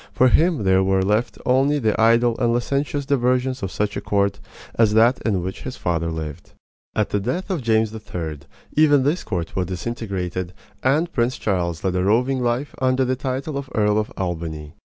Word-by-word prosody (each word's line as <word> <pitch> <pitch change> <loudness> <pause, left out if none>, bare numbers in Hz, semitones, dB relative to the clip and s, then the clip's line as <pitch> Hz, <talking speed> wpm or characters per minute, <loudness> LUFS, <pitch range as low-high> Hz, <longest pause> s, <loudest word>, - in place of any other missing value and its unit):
For 130 - +4
him 160 - +3
there 95 0 +4
were 95 0 +2
left 105 +5 0
only 135 +3 +3
the 110 -4 +1
idle 115 +1 +4
and 120 -2 +2
licentious 140 +4 -1
diversions 130 -1 +1
of 95 - -2
such 105 +2 -2
a - - -3
court 100 0 0 0.3
as 110 -2 +3
that 115 +4 +4
in 100 -6 0
which 95 +1 -5
his 130 - -6
father 85 -1 -1
lived. 80 -1 -6 0.4
At 110 - 0
the 105 - +1
death 150 - -3
of 175 -6 -1
James 110 -2 +1
III., 85 -8 -5 0.4
even 145 -3 +5
this 150 +6 0
court 85 -3 -4
was 90 -2 0
disintegrated, 95 -3 -4 0.3
and 155 +6 +1
Prince 120 0 0
Charles 85 -5 -1
led 95 -2 0
a 90 - +1
roving 125 +6 +2
life 120 +4 -1
under 130 0 +2
the 130 +1 0
title 135 +2 -3
of 140 -1 -8
Earl 105 0 +3
of 105 - -3
Albany. 80 -4 -4
110 Hz, 190 wpm, -22 LUFS, 95-130 Hz, 0.4 s, even